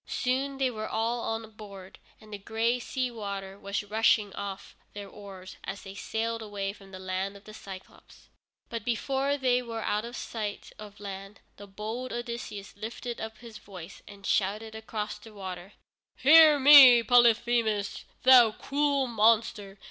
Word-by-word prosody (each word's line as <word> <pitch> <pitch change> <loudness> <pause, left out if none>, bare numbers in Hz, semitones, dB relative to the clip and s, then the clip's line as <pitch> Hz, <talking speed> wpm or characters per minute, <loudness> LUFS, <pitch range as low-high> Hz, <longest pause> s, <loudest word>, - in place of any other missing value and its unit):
Soon 270 +2 -2
they 265 -2 0
were 215 -2 -6
all 230 +2 -1
on 225 -1 -4
board, 200 -3 -12 0.2
and 215 -1 -14
the 205 - -6
gray 225 +4 -1
sea 255 +1 -3
water 200 -3 -6
was 200 0 -3
rushing 210 -1 +2
off 200 -1 -7 0.2
their 205 -1 -8
oars, 190 -2 -11
as 195 +1 -7
they 195 - -9
sailed 225 +3 -3
away 200 -2 -4
from 195 -2 -16
the 190 - -9
land 190 +1 -4
of 200 - -18
the 215 - -12
Cyclôpes. 195 -3 -13 0.4
But 230 -2 -6
before 270 +4 -1
they 250 -2 +1
were 230 -2 -6
out 210 +1 -1
of 240 +1 -8
sight 210 -3 -6
of 210 -1 -11
land, 195 0 -9 0.2
the 205 - -11
bold 220 +6 -6
Odysseus 235 -4 -6
lifted 230 +3 -6
up 220 0 -7
his 230 -2 -12
voice 185 -3 -11
and 200 -1 -13
shouted 210 +3 -1
across 220 -1 -5
the 215 0 -15
water: 190 0 -8 0.4
"Hear 310 +1 +7
me, 265 -4 +9
Polyphemus, 235 -3 +2 0.2
thou 245 -4 +7
cruel 280 +1 0
monster! 220 -3 +1
220 Hz, 160 wpm, -28 LUFS, 200-240 Hz, 0.4 s, me